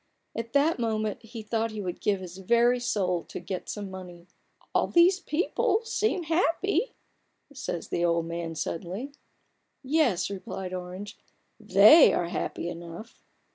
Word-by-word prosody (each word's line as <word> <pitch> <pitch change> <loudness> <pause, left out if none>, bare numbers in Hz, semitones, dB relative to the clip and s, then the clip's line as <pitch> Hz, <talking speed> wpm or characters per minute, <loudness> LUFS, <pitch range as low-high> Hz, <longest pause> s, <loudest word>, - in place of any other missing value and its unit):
At 230 +1 -5
that 290 +1 +3
moment 220 0 -1
he 225 0 -9
thought 225 +1 -1
he 215 -1 -7
would 180 -3 -5
give 200 -2 +1
his 180 0 -9
very 235 +5 +3
soul 185 -7 0
to - - -7
get 180 +1 -6
some 205 -2 -5
money, 180 -2 -10 0.2
" - - -34
All - - +2
these 355 +2 +5
people 390 +7 0
seem 425 -5 0
happy," 355 +8 +1 0.6
says 255 -10 -5
the 170 - -1
old 170 -1 +2
man, 165 0 -4
suddenly. 180 - -4 0.7
"Yes," 260 - +1
replied 190 -1 -6
Orange. 185 +3 -7 0.4
"They 215 - +8
are 170 - 0
happy 170 - -3
enough 170 +5 -9
210 Hz, 145 wpm, -27 LUFS, 180-255 Hz, 0.7 s, They